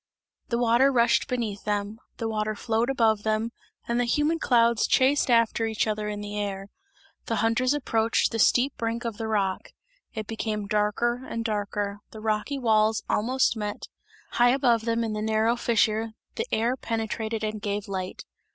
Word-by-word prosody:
The 235 - 0
water 240 +3 +4
rushed 235 -2 +3
beneath 230 -6 -3
them; 205 +1 -2 0.2
the 225 - -2
water 215 -1 -1
flowed 225 +3 0
above 225 -5 +2
them 220 +2 -1 0.4
and 235 0 0
the 245 - +2
humid 295 +7 +1
clouds 235 -2 +3
chased 270 +1 +3
each 225 -2 +2
other 215 -1 -2
in 205 0 -4
the 205 0 -5
air. 195 -1 -4 0.6
The 225 - 0
hunters 250 +4 +2
approached 225 -5 +1
the 225 - -3
steep 250 +5 +3
brink 230 +1 -3
of 230 -3 -3
the 225 - -3
rock; 200 -3 -1 0.5
it 220 -1 -4
became 215 -1 -3
darker 215 +4 0
and 230 0 -3
darker, 205 -1 -2
the 220 - -10
rocky 215 +6 -1
walls 220 -3 +2
almost 250 +2 +2
met; 210 -1 -5 0.4
high 240 0 +4
above 245 -4 +2
them 230 0 0
in 220 -1 -2
the 210 - -3
narrow 220 +2 +2
fissure 225 -1 +1 0.2
the 455 +1 -3
air 235 +3 +1
penetrated 225 -2 -3
and 215 -1 -3
gave 205 0 -3
light. 190 -1 -5
225 Hz, 170 wpm, -26 LUFS, 210-235 Hz, 0.6 s, water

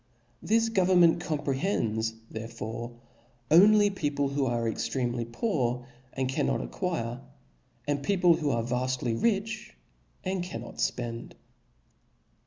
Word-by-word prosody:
This 225 +2 +2
go 195 -4 +2
vernment 175 -3 +5
comprehends 130 - -1 0.2
therefore 115 +1 -6 0.5
only 205 +4 +7
people 145 -6 -1
who 140 -1 0
are 120 -1 0
extremely 120 +1 -1
poor, 125 - -1 0.3
and 130 -1 -1
cannot 130 - 0
acquire; 125 -10 -3 0.7
and 145 -1 0
peo* 195 +7 +1
pie 175 -2 +5
who 150 - 0
are 115 -4 +1
vaftly 125 0 -1
rich, 215 - -1 0.5
and 185 -1 -1
cannot 120 -10 -7
fpend. 115 -1 -2
135 Hz, 115 wpm, -28 LUFS, 120-180 Hz, 0.7 s, only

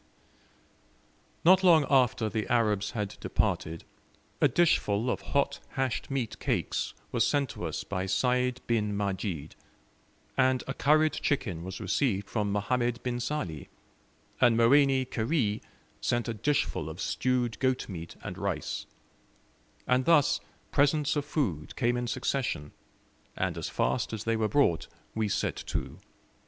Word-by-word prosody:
Not 185 +2 +7
long 165 -5 +6
after 125 -5 +3
the 110 0 -2
Arabs 110 -5 +2
had 105 -2 -3
departed, 80 +1 -1 0.6
a - - +7
dishful 125 -6 +2
of - - -3
hot 140 0 0
hashed 130 -3 -1
meat 135 -5 -3
cakes - - -1 0.2
was - - +2
sent 145 -3 +1
to - - -6
us 80 - -3
by 95 -1 -3
Sayd 125 +4 +1
bin 105 -3 0
Majid, 95 -6 -3 0.8
and 130 -1 +3
a 135 - -3
curried 155 +2 +3
chicken 100 - -1
was 95 +1 -6
received 100 -8 0
from 105 -3 0
Mohammed 120 +4 0
bin 120 -1 -2
Sali, 115 - -3 0.7
and 120 -3 +5
Moeni 135 +2 +5
Kheri 115 -3 0 0.4
sent 120 0 0
a 115 - -1
dishful 105 - 0
of 80 +3 -8
stewed 125 -1 0
goat 130 -1 +1
meat 85 -4 -7
and - - -6
rice; - - -3 1.0
and 125 0 +2
thus 155 -5 +4 0.3
presents 145 +1 +2
of 145 -1 -1
food 100 - -2
came 120 -2 +1
in 120 0 -2
succession, 125 - -2 0.7
and - - -1
as - - -4
fast 115 - 0
as 110 -1 -4
they 115 0 +1
were 110 -1 0
brought 140 - +2 0.3
we 110 -2 0
set - - -1
to. - - -4
120 Hz, 140 wpm, -29 LUFS, 105-135 Hz, 1.0 s, Not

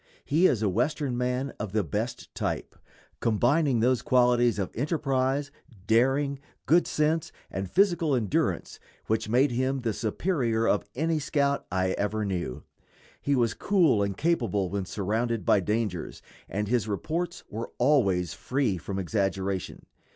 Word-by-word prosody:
He 165 +6 +4
is 110 -4 +1
a - - +3
Western 125 - 0
man 125 +2 -1
of 105 -2 -5
the 110 -1 +2
best 115 +5 -4
type, - - -3 0.4
combining 120 +3 +2
those 125 +1 +3
qualities 120 -2 +3
of 95 -3 -2
enterprise, 140 0 0 0.3
daring, 135 +5 +2 0.3
good 170 +3 +4
sense, 155 +1 0 0.2
and 95 -1 -4
physical 170 -7 +3
endurance 110 -6 -1 0.3
which 110 -1 -1
made 130 +5 +3
him 130 +2 0
the 115 -3 -1
superior 115 - 0
of 105 - +2
any 160 +3 0
scout 140 -1 0
I 95 0 +1
ever 105 +1 -1
knew. 90 -10 -3 0.6
He 140 - +1
was 120 -3 +2
cool 170 - +3
and 100 -1 -1
capable 115 - 0
when 100 -1 -2
surrounded 110 +5 -1
by - - +5
dangers, 105 -2 -2 0.3
and 105 +2 -2
his 115 -1 +1
reports 165 - -3
were 115 +3 -5
always 100 - +2
free 125 -9 -1
from 95 +3 -5
exaggeration. 95 -1 -2
120 Hz, 145 wpm, -27 LUFS, 105-140 Hz, 0.6 s, by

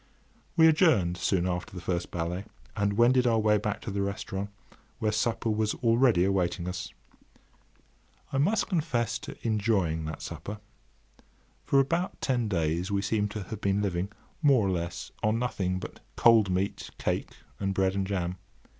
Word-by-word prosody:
We 160 -1 +8
adjourned 150 - +4
soon 90 -1 +1
after 90 +1 -3
the - - -5
first 85 0 -2
ballet, 90 +3 -3 0.3
and 100 -1 +1
wended 125 +3 +4
our 115 -1 +3
way 105 -1 +3
back 105 0 -3
to - - -5
the 100 0 -1
restaurant, 100 0 -3 0.5
where 110 -3 0
supper 110 +1 0
was 110 0 0
already 115 -5 +3
awaiting 90 -2 0
us. 90 0 -4 1.4
I 135 - +1
must 200 +9 +2
confess 120 - 0
to - - -9
enjoying 100 -8 +1
that 80 0 -6
supper. 105 +1 -6 1.1
For 140 - +4
about 170 +7 0
ten 120 -4 0
days 85 -1 0
we 100 -1 0
seemed 105 +1 0
to 100 0 -5
have 105 +3 -7
been 100 +1 +1
living, 95 0 -1 0.3
more 135 -8 +5
or - - +1
less, 85 0 -4
on 110 +1 +2
nothing 100 -7 -1
but - - -7 0.2
cold 115 -4 +5
meat, 95 +2 -1
cake, - - -2 0.3
and 95 -1 0
bread 95 0 +1
and 95 -1 -1
jam. 90 -2 -2
100 Hz, 165 wpm, -28 LUFS, 90-115 Hz, 1.4 s, We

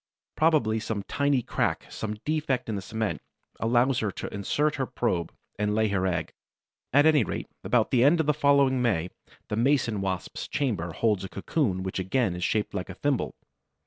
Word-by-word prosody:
Probably 150 -9 +3
some 110 -2 -3
tiny 140 +2 +1
crack, - - -1
some 110 -1 -4
defect 155 -4 0
in 110 - -2
the 100 - -3
cement, 110 +2 -3 0.4
allows 120 +3 +2
her 110 - 0
to - - -6
insert 145 +10 0
her 135 -2 -1
probe 90 -10 -1 0.3
and 105 0 +1
lay 110 0 +2
her 95 -1 +1
egg. 90 -2 -2 0.6
At 145 +3 +5
any 155 -5 +5
rate, 95 - -4 0.2
about - - +2
the 120 -1 +4
end 155 +5 +5
of 160 - +2
the 150 - +3
following 140 -3 +3
May, 90 -8 0 0.4
the 105 - -2
Mason 120 -4 +2
wasp's 95 -2 -3
chamber 105 - -1
holds 105 +3 +1
a 95 - -5
cocoon 100 - -1
which 95 0 -3
again 95 +1 0
is 90 - -4
shaped 105 +2 0
like 95 -2 -4
a 95 - -7
thimble. 125 - -1
110 Hz, 185 wpm, -27 LUFS, 95-140 Hz, 0.6 s, At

